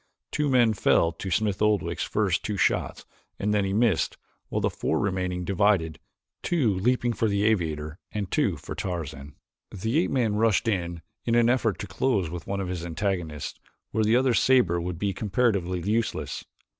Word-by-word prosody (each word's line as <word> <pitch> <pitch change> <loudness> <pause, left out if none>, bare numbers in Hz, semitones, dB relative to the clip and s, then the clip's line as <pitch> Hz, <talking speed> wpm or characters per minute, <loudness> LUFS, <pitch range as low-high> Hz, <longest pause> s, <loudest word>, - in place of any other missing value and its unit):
Two 150 -1 0
men 120 -4 +4
fell 85 -4 +3
to 90 +4 -6
Smith 105 +1 0
Oldwick's 105 -2 +1
first - - 0
two - - -2
shots - - 0 0.3
and 105 +1 0
then 105 -1 +2
he 95 - -1
missed, 105 -4 +1 0.3
while - - -1
the - - 0
four - - -1
remaining 90 -2 -1
divided, 95 -5 +2 0.4
two 140 - +1
leaping 120 +5 +1
for 115 - 0
the 100 -1 +1
aviator 80 -7 0
and 100 -3 -4
two - - +1
for - - -7
Tarzan. 75 -6 -5 0.3
The 110 - -1
ape 175 - +1
man 115 -6 +1
rushed 115 +1 +2
in 85 -5 -1 0.2
in 115 - +2
an 120 0 +4
effort 115 -5 +1
to - - -5
close 95 -3 0
with 85 -1 -7
one 100 0 -2
of 95 - -2
his 90 -2 -4
antagonists 85 -3 -3 0.3
where 110 - +1
the 110 +2 +3
other's 125 -1 +3
saber 100 -10 +3
would 90 0 -4
be 100 +2 -1
comparatively 95 -3 0
useless. 110 +4 -1
100 Hz, 180 wpm, -26 LUFS, 90-115 Hz, 0.4 s, men